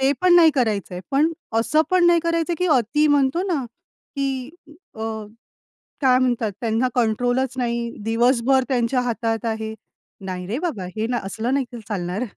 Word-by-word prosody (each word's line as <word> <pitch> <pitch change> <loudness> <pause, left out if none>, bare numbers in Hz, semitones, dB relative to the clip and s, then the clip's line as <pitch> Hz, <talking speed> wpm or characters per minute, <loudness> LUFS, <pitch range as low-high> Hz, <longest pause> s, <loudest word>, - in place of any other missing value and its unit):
ते 265 +1 +3
पण 360 -1 +5
नाही 330 -2 +7
करायचंय, 205 -7 -1
पण 300 +4 +2 0.3
असं 305 +7 +2
पण 365 -1 +4
नाही 340 -1 +5
करायचंय, 335 +1 0
की 360 - +1
अती 255 +6 +2
म्हणतो 290 +3 +2
ना, 305 -9 -1 0.5
की 270 -1 -2 0.4
अ, 220 - -10 1.0
काय 255 -2 +5
म्हणतात 240 -4 0
त्यांना 230 +2 +1
कंट्रोलच 245 +3 +1
नाही, 235 -1 -1
दिवसभर 245 +3 +2
त्यांच्या 250 -1 +1
हातात 230 -2 -2
आहे. 220 -1 -3 0.5
नाही 180 -1 -5
रे 225 +6 -2
बाबा 320 - -3
हे 220 +1 -1
ना 245 - 0
असलं 225 +6 -2
नाही, 275 -2 +1
की 240 - -7
चालणार. 185 0 -3
250 Hz, 160 wpm, -22 LUFS, 225-275 Hz, 1.0 s, नाही